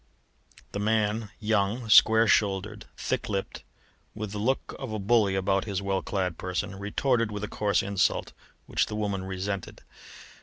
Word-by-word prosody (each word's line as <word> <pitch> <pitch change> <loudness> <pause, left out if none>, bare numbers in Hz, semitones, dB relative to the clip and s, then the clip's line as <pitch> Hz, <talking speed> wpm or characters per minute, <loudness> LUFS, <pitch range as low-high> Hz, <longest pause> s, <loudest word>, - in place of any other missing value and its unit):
The 100 - -4
man 110 0 0
young, 110 +2 0
square 110 +1 +7
shouldered, 105 0 +1
thick 125 -2 -2
lipped, 100 -2 -3 0.5
with 105 -2 -5
the 105 - -4
look 130 +6 -1
of 130 -4 -5
a 110 - -2
bully 105 -1 +2
about 95 0 +1
his 100 -4 -2
well 100 -1 -1
clad 90 -4 -2
person 95 +2 -3
retorted 115 +3 0
with 105 0 -5
a - - -2
coarse 100 -2 0
insult, 100 -2 0 0.3
which - - 0
the 105 - -5
woman 100 -3 -2
resented. 95 0 -4
105 Hz, 155 wpm, -27 LUFS, 95-110 Hz, 0.5 s, square